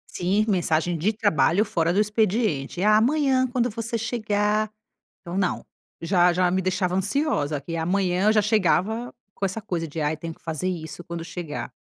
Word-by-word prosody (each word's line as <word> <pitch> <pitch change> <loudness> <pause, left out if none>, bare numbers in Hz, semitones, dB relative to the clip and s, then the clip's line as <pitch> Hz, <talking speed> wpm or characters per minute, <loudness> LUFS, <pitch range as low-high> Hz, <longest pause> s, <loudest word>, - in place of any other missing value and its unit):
Sim, 195 +4 +1
mensagem 175 -3 +1
de 175 +7 +1
trabalho 205 -2 +2
fora 170 -5 0
do 195 - +1
expediente. 210 - 0
Amanhã, 260 +5 +3
quando 245 -1 0
você 230 +1 -3
chegar! 215 -2 0 0.5
Então 175 0 -7
não! 190 -2 -1 0.4
Já 175 0 +3
já 180 0 +2
me 190 - +1
deixava 185 -1 0
ansiosa 190 - 0
que, 165 +4 -6
amanhã, 180 +2 0
eu - - +6
já 215 - +4
chegava 215 +2 +1 0.2
com - - -8
essa 190 +4 -2
coisa 175 -6 -3
de, 155 +2 -6
ai, 150 +1 0
tenho 165 +1 -6
que - - -29
fazer 160 +2 -3
isso 175 -1 -6
quando 170 -1 -6
chegar. 165 -7 -6
190 Hz, 170 wpm, -24 LUFS, 170-215 Hz, 0.5 s, eu